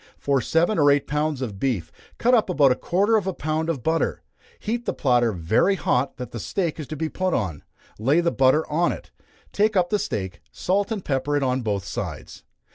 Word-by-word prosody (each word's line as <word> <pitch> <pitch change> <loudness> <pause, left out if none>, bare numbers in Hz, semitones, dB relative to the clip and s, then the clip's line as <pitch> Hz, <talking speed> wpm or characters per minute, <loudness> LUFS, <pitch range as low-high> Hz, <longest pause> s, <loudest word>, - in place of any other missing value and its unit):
For 140 -2 +1
seven 165 - +1
or 145 -1 +5
eight 140 0 +3
pounds 150 -2 -1
of 105 -6 -5
beef, 120 -11 -1 0.3
cut 245 +2 +2
up 225 -5 +3
about 145 -7 +4
a - - +3
quarter 200 - +2
of 200 -3 -2
a 190 - -2
pound 155 +2 -2
of 140 -8 -2
butter. 160 0 0 0.3
Heat 235 +2 -3
the - - -1
platter 120 -4 +2
very 100 - +2
hot 135 -6 0
that 125 -3 -7
the 120 - -6
steak 165 - -2
is 150 - -5
to 155 - -5
be 160 +2 -2
put 185 +2 -1
on, 90 -10 -3 0.4
lay 135 +9 +3
the 170 -1 +1
butter 135 +4 +3
on 170 +3 +1
it, - - -8 0.4
take 210 +1 +1
up 175 -1 +2
the 210 - +2
steak, 95 - -4
salt 200 +4 -1
and 210 -4 -3
pepper 145 +1 0
it 145 - 0
on 130 0 0
both 100 -5 -2
sides. - - -6
150 Hz, 215 wpm, -24 LUFS, 125-180 Hz, 0.4 s, or